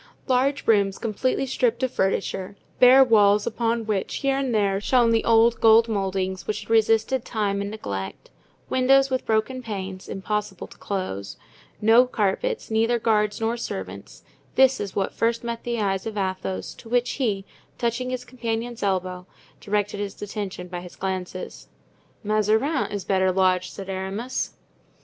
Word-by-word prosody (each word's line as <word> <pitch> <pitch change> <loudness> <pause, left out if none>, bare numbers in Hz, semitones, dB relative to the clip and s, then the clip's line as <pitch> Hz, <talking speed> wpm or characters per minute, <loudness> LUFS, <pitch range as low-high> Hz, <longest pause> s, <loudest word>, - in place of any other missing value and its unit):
Large 270 +2 +1
rooms, 200 -3 +3
completely 245 +4 -1
stripped 245 -1 0
of 260 - +1
furniture, 195 0 -1 0.2
bare 255 +2 +8
walls 210 -4 +4
upon 230 0 -1
which, 210 -3 -2
here 275 -1 0
and 270 -2 -1
there, 200 -3 +1
shone 240 0 +3
the 225 -1 +2
old 230 0 +4
gold 225 +1 +6
moldings 190 -3 -2
which 215 0 -2
had - - -9
resisted 225 +3 +3
time 200 -3 -1
and 200 - -3
neglect, 100 - -6 0.4
windows 270 +1 +3
with 260 - -1
broken 220 +4 0
panes 190 -5 -6
(impossible 205 0 -3
to - - -16
close), 100 - -4 0.4
no 230 +4 +6
carpets, 250 - -1
neither 225 +2 +2
guards 210 -2 +1
nor 225 +1 0
servants: 95 - -7 0.3
this 265 0 +5
is 200 -2 -5
what 195 - -1
first 230 0 0
met 235 -1 -4
the 235 -1 -2
eyes 195 -1 -1
of 215 -1 -5
Athos, 190 -1 -3
to 225 - -14
which 245 0 +1
he, 200 -6 0 0.3
touching 240 +2 -1
his 255 -1 -4
companion's 235 -1 -4
elbow, 185 -2 -2 0.3
directed 205 0 -1
his 205 -1 -5
attention 200 -3 -5
by 175 -1 -6
his 180 -1 -11
glances. 185 -1 -5 0.6
"Mazarin 215 +7 +1
is 205 -2 -4
better 190 -1 +2
lodged," 185 -1 +1
said 195 - -8
Aramis. 195 +6 -3
215 Hz, 155 wpm, -24 LUFS, 195-235 Hz, 0.6 s, bare